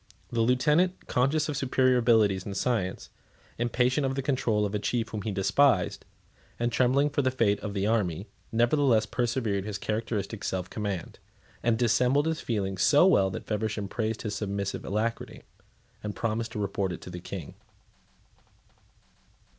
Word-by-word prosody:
The 115 - +1
lieutenant, 150 +10 +2
conscious 145 +5 +1
of 150 - -3
superior 130 -1 +2
abilities 110 -6 +3
and 100 0 -5
science, 105 -7 -1 0.5
impatient 125 +4 +1
of 135 0 0
the 135 - -2
control 120 -6 +1
of 100 - -3
a 105 - 0
chief 115 +2 -1
whom 105 - -4
he 105 - -3
despised, 100 +2 +2 0.5
and 120 0 0
trembling 130 +4 +2
for 145 - +1
the 130 - +2
fate 110 -6 +1
of 105 -1 -5
the 100 0 0
army, 100 -5 0 0.3
nevertheless 120 -1 +3
preserved 115 -5 -1
his 105 -2 -3
characteristic 110 0 -3
self 95 -1 -3
command, 100 -5 -4 0.4
and 115 -1 +2
dissembled 125 +4 +3
his 160 -1 -1
feelings 95 -5 -2
so 145 +6 +6
well 100 - +4
that 95 - -6
Feversham 105 -1 -2
praised 110 +2 -3
his 105 -2 -3
submissive 100 -1 -3
alacrity, 110 +4 -3 0.6
and 105 -1 -4
promised 115 +1 -2
to - - -4
report 100 -1 -1
it 85 - -6
to 90 - -9
the 90 - -6
King. 90 -3 -7
110 Hz, 160 wpm, -28 LUFS, 100-125 Hz, 0.6 s, so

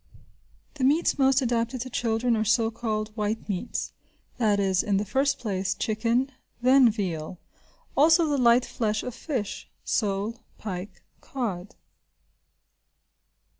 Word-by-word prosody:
The 280 - -4
meats 295 +3 +3
most 270 0 +4
adapted 240 +1 -1
to 255 - -5
children 230 +1 +1
are 215 - +1
so 225 +1 +2
called 215 -2 -2
white 215 0 -2
meats, 200 +3 -3 0.5
that 210 -4 +3
is, 190 -2 +2
in 200 -2 0
the 205 - -1
first 270 +7 +1
place, 195 -3 -2
chicken, 230 +6 0 0.3
then 255 0 +6
veal; 180 -6 -3 0.6
also 320 +4 +5
the 290 -2 0
light 240 0 +5
flesh 215 -2 -1
of 250 - -5
fish, 250 -6 -4
(sole, 210 +1 -1 0.2
pike, 190 -1 -7 0.2
cod). 205 -8 -5
225 Hz, 130 wpm, -26 LUFS, 205-255 Hz, 0.6 s, then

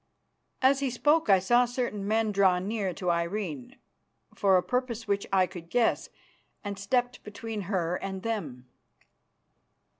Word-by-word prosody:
As 270 +1 +5
he 275 -1 0
spoke 295 +3 +2
I 195 - +7
saw 240 +7 +3
certain 240 -5 -3
men 220 0 +1
draw 195 -2 +4
near 195 +1 -2
to 180 +1 -1
Irene 170 - -3 0.6
for 195 -2 +3
a 180 - +1
purpose 250 -3 -2
which 200 0 -1
I 190 -1 +4
could 175 -2 -10
guess, 245 +2 +1 0.5
and 200 -1 -5
stepped 245 +4 -1
between 210 -2 -6
her 180 -3 0
and 190 0 -6
them. 155 - -4
205 Hz, 145 wpm, -28 LUFS, 185-235 Hz, 0.6 s, I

